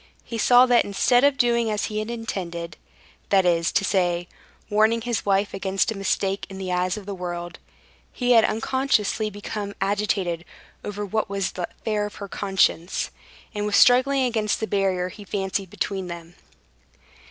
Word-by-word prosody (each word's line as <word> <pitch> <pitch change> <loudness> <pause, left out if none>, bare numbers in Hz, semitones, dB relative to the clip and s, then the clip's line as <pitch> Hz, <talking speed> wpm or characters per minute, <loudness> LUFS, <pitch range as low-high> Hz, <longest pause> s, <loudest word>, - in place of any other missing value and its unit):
He 230 -1 -6
saw 245 +3 +6
that 245 -2 +4
instead 245 +5 +2
of 285 -1 +4
doing 235 -2 +2
as 210 -1 -1
he 215 -1 -3
had 215 +1 -4
intended—that 190 -3 -3
is 170 -1 +2
to 200 - +2
say, 175 -2 +1 0.4
warning 220 +2 +3
his 235 -2 -2
wife 200 +1 +2
against 195 +2 0
a - - -4
mistake 195 0 -1
in 195 - -8
the 190 -1 -4
eyes 180 +2 0
of 205 - -8
the 200 - -5
world—he 175 +7 -6
had 230 -2 +7
unconsciously 220 -3 0
become 205 0 -6
agitated 195 -4 -1 0.4
over 205 0 -4
what 215 +2 -1
was 195 -2 -1
the 180 - -4
affair 210 -2 -2
of 210 - -12
her 200 - -7
conscience, 190 -3 0 0.4
and 210 -1 -2
was 210 - 0
struggling 260 +2 +5
against 220 -4 0
the 220 - -1
barrier 190 -3 0
he 205 +3 -11
fancied 195 -1 -3
between 190 -1 -3
them. 170 -1 -8
200 Hz, 165 wpm, -24 LUFS, 185-220 Hz, 0.4 s, had